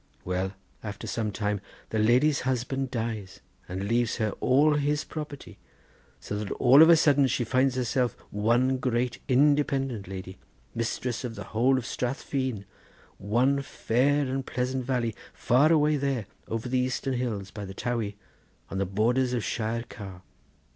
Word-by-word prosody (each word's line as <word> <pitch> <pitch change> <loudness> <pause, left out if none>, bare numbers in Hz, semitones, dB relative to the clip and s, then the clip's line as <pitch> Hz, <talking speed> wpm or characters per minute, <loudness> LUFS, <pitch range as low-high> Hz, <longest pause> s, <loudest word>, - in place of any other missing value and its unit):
Well, 95 +1 -1 0.3
after 105 -2 -6
some 110 -2 -2
time 105 -1 -2 0.3
the 110 - 0
lady's 125 +7 +4
husband 130 +1 -1
dies 110 -5 -4 0.3
and 95 +2 -3
leaves 120 +1 +1
her 110 -3 0
all 145 +4 +4
his 145 +1 +1
property, 150 -3 -8 0.6
so 105 - -4
that 105 -2 -4
all 135 +4 +6
of 160 - +8
a 170 - +9
sudden 145 -3 +4
she 120 - 0
finds 130 +2 +2
herself 125 0 0 0.2
one 120 +5 +2
great 125 -1 -1
independent 135 -5 +2
lady, 95 -1 -7 0.3
mistress 115 +1 -2
of 120 -2 -5
the 105 - -6
whole 130 +4 +3
of 125 - -3
Strath 125 +3 -3
Feen, 130 -7 -2 0.5
one 125 +7 +2
fair 140 +2 +1
and 135 +1 -2
pleasant 130 0 -2
valley 120 -3 0 0.2
far 140 +6 +3
away 150 -1 +4
there 135 -5 -1 0.2
over 115 +2 -3
the 130 +1 +1
Eastern 130 +1 -1
hills; 110 -6 -3
by 105 - -7
the 95 0 -8
Towey; 115 -4 -2 0.6
on 95 - -2
the 100 - 0
borders 120 +6 +1
of 120 -3 -1
Shire 115 +1 -2
Car. 95 -3 -9
125 Hz, 160 wpm, -27 LUFS, 110-135 Hz, 0.6 s, a